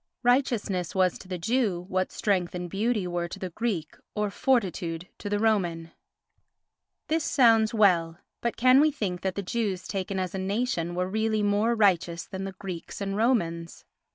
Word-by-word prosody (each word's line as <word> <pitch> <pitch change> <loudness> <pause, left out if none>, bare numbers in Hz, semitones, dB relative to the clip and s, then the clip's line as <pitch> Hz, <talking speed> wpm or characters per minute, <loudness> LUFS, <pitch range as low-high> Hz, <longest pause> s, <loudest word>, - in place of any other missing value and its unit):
Righteousness 235 - +1
was 185 -2 +2
to - - -12
the 185 -1 -4
Jew 195 -2 0
what 185 -1 -1
strength 185 -4 0
and 180 0 -4
beauty 210 +2 0
were 175 -1 -2
to 175 - -8
the 185 -2 -5
Greek 190 -6 -3 0.2
or 210 -1 -1
fortitude 180 -9 0
to 205 - -5
the 205 - +1
Roman. 175 -7 0 1.2
This 320 0 +1
sounds 225 -6 +4
well, 175 -7 +3 0.2
but 235 - -2
can 255 +2 +6
we 310 - +5
think 205 -11 -3
that 190 -1 -2
the 200 - -3
Jews 195 -2 -2
taken 195 0 -3
as 185 -1 -3
a 190 - -3
nation 190 -4 -1
were 180 +1 0
really 220 +1 0
more 205 +3 +2
righteous 175 -5 +2
than 190 0 -6
the 195 - -5
Greeks 185 -4 -7
and 195 -1 -2
Romans? 170 -8 0
195 Hz, 175 wpm, -27 LUFS, 180-220 Hz, 1.2 s, can